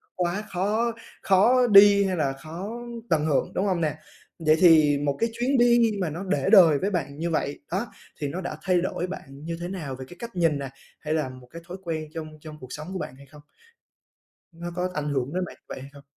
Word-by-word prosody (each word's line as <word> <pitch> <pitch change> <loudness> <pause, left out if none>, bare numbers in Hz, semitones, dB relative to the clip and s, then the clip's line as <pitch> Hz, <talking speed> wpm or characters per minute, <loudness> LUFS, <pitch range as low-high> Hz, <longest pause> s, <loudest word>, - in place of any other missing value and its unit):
quá 180 +4 -1
khó 210 +6 0 0.3
khó 235 +7 +4
đi 200 -1 +8
hay 185 -1 0
là 140 -4 0
khó 170 +9 -7 0.4
tận 155 -2 +2
hưởng, 150 -4 +1
đúng 195 - 0
hông 180 -4 0
nè? 155 -2 0 0.4
Vậy 155 -1 +4
thì 155 -5 +6
một 140 -1 -1
cái 230 - +1
chuyến 260 +3 +2
đi 240 -1 +5
mà 175 - 0
nó 170 +5 -5
để 195 0 0
đời 170 -9 +7
với 195 - 0
bạn 140 -6 -3
như 170 +1 -1
vậy 150 -3 -2
đó 195 +6 -1 0.3
thì 145 - -2
nó 175 +7 -4
đã 175 - -5
thay 185 -3 +2
đổi 185 -1 -2
bạn 190 - -6 0.2
như 165 0 -4
thế 175 - -3
nào 165 -8 -5
về 130 0 -8
cái 175 - -12
cách 235 -2 -8
nhìn 165 -5 +2
nè, 135 - -5 0.3
hay 155 0 -3
là 155 -4 0
một 130 -1 -13
cái 170 - -9
thói 180 +1 -7
quen 160 -3 -3
trong 160 -2 -5
trong 155 -1 -10
cuộc 130 - -10
sống 155 +2 -7
của 190 - -3
bạn 130 - -6
hay 140 - -15
không? 145 +2 -16 1.1
Nó 170 +1 -7
có 180 0 -1
ảnh 150 -2 -2
hưởng 135 0 -2
đến 185 0 -1
bạn - - -11
như - - -54
vậy - - -7
hay 135 - -10
không? 140 0 -14
170 Hz, 240 wpm, -25 LUFS, 150-190 Hz, 1.1 s, đi